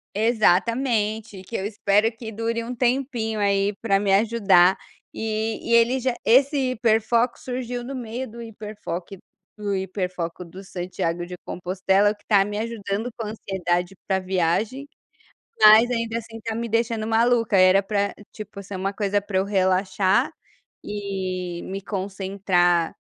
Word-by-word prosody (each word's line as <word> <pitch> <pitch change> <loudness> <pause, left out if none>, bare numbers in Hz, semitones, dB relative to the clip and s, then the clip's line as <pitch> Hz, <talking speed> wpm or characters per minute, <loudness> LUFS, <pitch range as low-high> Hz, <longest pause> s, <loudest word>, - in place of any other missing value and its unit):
Exatamente, 220 -1 +1
que 230 - -8
eu 190 - -2
espero 210 +1 +2
que 225 0 -8
dure 230 +1 -2
um 245 +2 -5
tempinho 240 -3 0
aí 200 0 +2
para 195 -3 +2
me 200 -1 0
ajudar, 195 -4 +4 0.4
e 220 0 -2
e - - +6
ele 240 +3 +4
já 255 -1 -1
esse 265 +2 +4
hiperfoco 230 +1 +2
surgiu 245 -1 -4
no 270 +2 -6
meio 245 +1 -5
do 235 +2 -10
hiperfoco 205 -4 -7 0.4
do 205 -2 -2
hiperfoco 180 -2 -4
do 185 +3 -11
Santiago 175 -2 -3
de 180 - -7
Compostela 190 +3 +1
que 205 - -29
está 200 -3 +4
me 205 0 -4
ajudando 220 0 -3
com 225 -2 -5
a - - -4
ansiedade 180 -3 -2
para 190 -1 +1
viagem, 190 - -1 0.7
mas 215 +3 +8
ainda 230 -1 -1
assim 225 0 -9
está 225 0 -4
me 235 0 -3
deixando 230 -1 0
maluca, 230 -1 +2
era 185 +1 +6
pra 200 0 -1 0.2
tipo 210 -2 -9
ser 200 - -8
uma 195 +2 -2
coisa 205 0 0
para 200 -2 -1
eu 190 - +1
relaxar 190 +3 +1 0.5
e 185 -4 -4
me 195 +1 -5
concentrar 190 -3 0
210 Hz, 150 wpm, -23 LUFS, 190-230 Hz, 0.7 s, mas